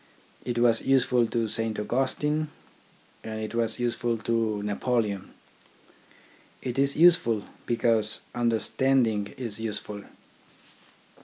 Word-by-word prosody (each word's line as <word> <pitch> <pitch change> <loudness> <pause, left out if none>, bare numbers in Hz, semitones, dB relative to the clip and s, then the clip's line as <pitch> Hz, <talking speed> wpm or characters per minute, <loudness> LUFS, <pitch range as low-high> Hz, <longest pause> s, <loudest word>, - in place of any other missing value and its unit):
It 120 -1 -3
was 120 -1 +4
useful 125 -3 +2
to 115 0 -1
Saint 115 0 -1
Augustine 135 +7 0 0.8
and 110 0 -5
it 110 +1 -5
was 115 -1 +2
useful 120 -1 -1
to 110 -2 -1
Napoleon. 105 -1 -1 1.3
It 125 +1 -3
is 140 0 +3
useful, 155 - +4 0.2
because 115 -2 +1
understanding 115 -2 +1
is 115 -5 -3
useful. 105 -2 -4
115 Hz, 100 wpm, -26 LUFS, 110-125 Hz, 1.3 s, was